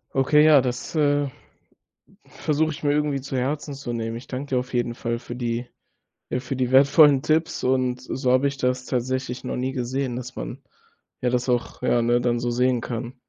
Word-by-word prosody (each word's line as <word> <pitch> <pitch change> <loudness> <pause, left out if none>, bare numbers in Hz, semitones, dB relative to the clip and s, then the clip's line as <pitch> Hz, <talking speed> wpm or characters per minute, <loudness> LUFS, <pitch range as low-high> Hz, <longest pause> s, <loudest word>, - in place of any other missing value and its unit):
Okay, 145 +3 +4
ja, 155 -2 +7
das, 125 -1 -4
äh, 145 -2 +2 1.0
versuche 155 +1 -1
ich 150 - -9
mir 145 -1 +2
irgendwie 145 -2 0
zu 135 0 -4
Herzen 145 +3 -2
zu 135 -3 -5
nehmen. 115 0 -3
Ich 120 - -13
danke 135 +2 -5
dir - - +3
auf 125 +1 -5
jeden 120 -1 0
Fall 115 0 -3
für 120 0 -8
die 120 0 -3 0.6
äh, 125 - -2
für 130 +1 -5
die 125 -1 -1
wertvollen 140 +1 +6
Tipps 160 +2 0
und 125 -1 +1
so 130 0 -2
habe 130 +2 +4
ich 140 0 -6
das 125 -1 0
tatsächlich 130 0 -2
noch - - -3
nie 130 +1 -2
gesehen, 130 0 -2
dass 125 0 -7
man, - - -6 0.6
ja, 125 - +2
das 125 +1 -1
auch, 120 -1 -1
ja, 120 -1 +2
ne, 120 +1 +2
dann 120 -1 +1
so 120 0 -2
sehen 125 0 +1
kann. 120 +1 -5
130 Hz, 205 wpm, -24 LUFS, 120-140 Hz, 1.0 s, ja